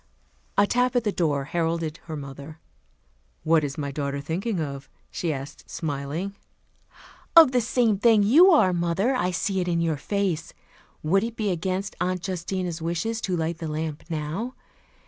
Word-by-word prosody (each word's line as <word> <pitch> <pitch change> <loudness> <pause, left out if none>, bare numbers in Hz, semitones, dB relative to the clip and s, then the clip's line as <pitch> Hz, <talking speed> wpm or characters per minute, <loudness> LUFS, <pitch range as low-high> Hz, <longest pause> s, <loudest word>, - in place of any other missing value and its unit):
A 200 - +6
tap 250 +3 +1
at 245 - +3
the 210 - +1
door 150 -7 0
heralded 165 +1 -1
her 160 -2 -5
mother. 140 +2 -8 0.9
"What 160 -1 +3
is 140 -1 -3
my 140 -2 -3
daughter 140 0 -3
thinking 175 +8 -2
of?" 140 -3 -5 0.2
she 170 - -2
asked, 140 -1 -7
smiling. 155 +5 -3 1.0
"Of 325 -5 +9
the 250 -1 +3
same 230 -3 +2
thing 220 -2 +5
you 310 - +7
are, 290 - +5
mother. 175 +8 +1
I 180 -8 +1
see 190 +2 -1
it 180 - -1
in 170 -1 +1
your 165 -2 0
face. 195 0 -2 0.5
Would 195 +6 +3
it 230 0 -4
be 210 -3 0
against 185 +3 -2
Aunt 180 -1 -1
Justina's 180 -2 -3
wishes, 175 +8 -2
to 185 -2 -1
light 165 +1 -2
the 165 - -4
lamp 155 0 -4
now? 165 +11 -3
175 Hz, 165 wpm, -25 LUFS, 155-200 Hz, 1.0 s, Of